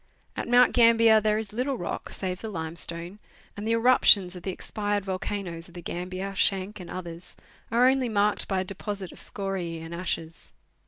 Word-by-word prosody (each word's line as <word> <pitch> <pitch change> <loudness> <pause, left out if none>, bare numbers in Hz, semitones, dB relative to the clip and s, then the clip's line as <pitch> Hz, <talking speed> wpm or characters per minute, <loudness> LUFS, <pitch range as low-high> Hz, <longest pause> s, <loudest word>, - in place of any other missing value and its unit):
At - - -4
Mount 245 0 +5
Gambier 230 -2 +6
there 215 0 +2
is 215 -2 -4
little 255 +3 -1
rock, 175 - -4
save 185 -1 -4
the 220 - -5
limestone, 170 +1 -6 0.4
and 205 +1 -5
the 225 - +2
eruptions 225 -6 +5
of 180 - -8
the 190 - -4
expired 205 +1 -2
volcanoes 185 -3 -4
of 175 - -18
the 175 - -7
Gambier, 185 +2 -4
Schanck 195 +1 +1
and 180 - -9
others 175 -1 -7 0.3
are 240 +2 +4
only 260 -2 +2
marked 210 -1 +1
by 190 -2 0
a - - -4
deposit 195 0 -5
of - - -12
scoriae 190 -4 -3
and 165 +1 -8
ashes. 165 -2 -4
195 Hz, 180 wpm, -27 LUFS, 180-220 Hz, 0.4 s, Gambier